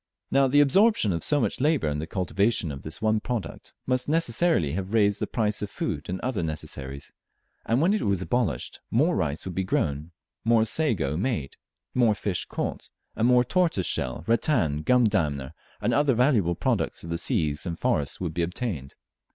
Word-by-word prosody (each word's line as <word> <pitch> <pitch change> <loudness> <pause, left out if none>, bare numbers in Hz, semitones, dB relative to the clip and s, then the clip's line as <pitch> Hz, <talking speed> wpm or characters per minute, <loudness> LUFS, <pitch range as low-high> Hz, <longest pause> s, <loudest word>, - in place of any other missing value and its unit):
Now 135 0 +4
the 145 +3 +5
absorption 190 - +4
of 85 - -3
so 150 - +2
much - - -1
labour 150 - +2
in 75 0 -1
the 80 - -4
cultivation 95 0 0
of 70 -1 -7
this 80 +10 -6
one 110 0 +3
product 120 -2 -5
must 130 +1 0
necessarily 165 - +2
have 95 +5 -4
raised 105 -2 +3
the - - -2
price 105 -3 -1
of 105 - -3
food 75 +3 -4
and 95 +1 -3
other 125 -7 -2
necessaries; 70 -3 -5 0.5
and 120 +4 +2
when 180 +5 +3
it 215 - 0
was 100 -3 +1
abolished, 95 - -2
more 155 +10 +2
rice 75 0 -2
would 95 - -5
be 95 - -1
grown, 75 -4 -1 0.3
more 115 -1 +4
sago 110 - +1
made, 95 - -2 0.4
more 120 -4 +3
fish 100 -4 -2
caught, - - -4 0.3
and 115 - +2
more 125 0 +5
tortoise 165 - +1
shell, 65 +4 -2
rattan, 110 - +1
gum 125 +9 +3
dammer, 75 - 0 0.3
and - - 0
other 145 -3 +3
valuable 115 - +2
products - - -1
of 85 - -7
the 85 - -1
seas 75 0 0
and 85 -1 -3
the - - -27
forests 70 -1 0
would 85 -4 -3
be 85 - -1
obtained. 85 - -4
100 Hz, 190 wpm, -26 LUFS, 80-125 Hz, 0.5 s, the